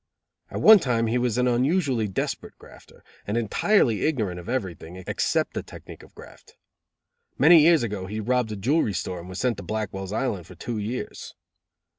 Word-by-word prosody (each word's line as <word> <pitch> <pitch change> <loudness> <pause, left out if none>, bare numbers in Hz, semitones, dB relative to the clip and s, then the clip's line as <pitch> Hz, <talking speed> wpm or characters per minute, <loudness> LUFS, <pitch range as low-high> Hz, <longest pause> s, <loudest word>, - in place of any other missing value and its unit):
At - - -5
one 220 -1 +9
time 120 -7 0
he 115 +2 0
was 120 -2 0
an 125 0 +2
unusually 125 - +1
desperate 95 - -4
grafter; - - -17 0.2
and 105 +3 -1
entirely 120 - +2
ignorant 110 - -1
of 90 - -10
everything, 95 -8 -4
except - - -1
the - - -3
technique - - -12
of - - -18
theft. - - -15 0.8
Many 160 +3 +7
years 160 -2 +5
ago 100 -4 -4
he 105 +3 -5
robbed 125 +1 0
a - - -3
jewelry 115 +2 +1
store 90 0 -4
and 85 +2 -10
was 95 - -7
sent 125 -2 0
to 100 - -8
Blackwell's 95 -1 -4
Island 105 -7 -2
for 90 - -13
two 110 +6 -5
years. 110 +5 -6
115 Hz, 180 wpm, -25 LUFS, 100-125 Hz, 0.8 s, one